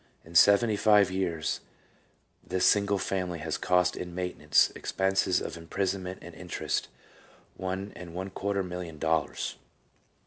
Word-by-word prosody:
In 80 - -13
seventy 100 +5 +6
five 105 -3 +5
years 85 -4 -1 0.8
this 95 0 0
single 100 -1 +4
family 90 -3 -2
has 80 0 -3
cost 90 0 +2
in 90 -1 -6
maintenance, 90 -4 +2
expenses 95 -1 +1
of - - -5
imprisonment 95 +2 -3
and 85 +1 -10
interest, 90 +1 -3 0.7
one 95 +2 -4
and 85 -1 -9
one 95 +1 -4
quarter 100 +1 -1
million 90 -3 -6
dollars. 80 0 -1
90 Hz, 130 wpm, -29 LUFS, 85-95 Hz, 0.8 s, seventy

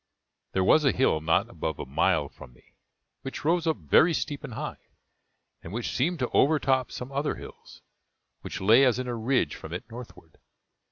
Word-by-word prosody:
There 95 - +1
was 155 +11 +5
a 140 - +4
hill 125 -12 +1
not 80 +7 +2
above 80 -8 -4
a - - -5
mile 65 - +1
from - - -14
me, - - -26 0.5
which 135 +2 -7
rose 170 +1 +2
up 160 - +1
very 130 - +4
steep 145 0 -4
and 130 -7 -7
high, - - -7 0.7
and 80 - -10
which 115 +3 -4
seemed 170 +7 +1
to 125 - 0
overtop 135 -3 +2
some 125 +2 -7
other 140 +2 -1
hills, - - -13 0.6
which - - -6
lay 115 +7 +6
as 125 -3 +3
in 130 0 -4
a 120 - -2
ridge 115 - 0
from 80 - -9
it 90 - -6
northward. 115 -9 -12
125 Hz, 185 wpm, -27 LUFS, 95-140 Hz, 0.7 s, lay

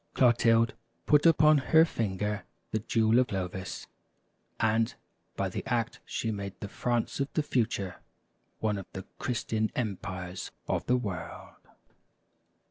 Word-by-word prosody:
" - - -43
Clotilde 115 -2 +4 0.3
put 150 +2 +5
upon 155 -2 +6
her 160 +4 +5
finger 105 - -2 0.3
the 110 - +1
jewel 110 +2 +3
of 130 - +3
Clovis; 95 -2 -4 0.7
and 110 0 +2 0.4
by - - 0
the - - -4
act - - -1
she 115 - -2
made 100 -2 -5
the 100 - -5
France 120 +5 -1
of 140 0 -1
the 155 - +2
future 110 -9 -1 0.6
one 105 -2 0
of 95 - -9
the 95 - -6
Christian 110 -3 -1
empires 95 -5 -4 0.2
of - - -1
the 125 - +4
world. 95 -9 -5
110 Hz, 135 wpm, -29 LUFS, 100-125 Hz, 0.7 s, upon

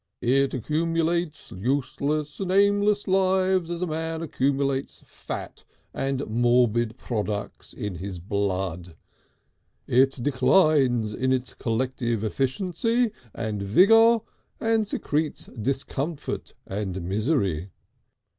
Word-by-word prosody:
It 135 +3 +2
accumulates 165 +4 -1
useless 140 +6 -1
and 190 -2 -3
aimless 205 +2 +3
lives 190 -2 +2
as 175 +1 -3
a - - +2
man 160 0 -3
accumulates 140 -2 -1
fat - - -7 0.3
and 135 0 -1
morbid 120 0 +2
products 105 -3 -4
in 100 -4 -5
his 95 +1 -5
blood, 90 -2 -2 0.9
it 130 0 +2
declines 130 - +3
in 130 +4 0
its 130 -1 -1
collective 120 -1 -1
efficiency 185 - 0 0.2
and 110 -3 -3
vigour 225 - +5 0.4
and 225 -2 +1
secretes 155 -5 -2
discomfort 140 +5 -3
and 95 -2 -4
misery. 100 - 0
135 Hz, 100 wpm, -25 LUFS, 110-165 Hz, 0.9 s, vigour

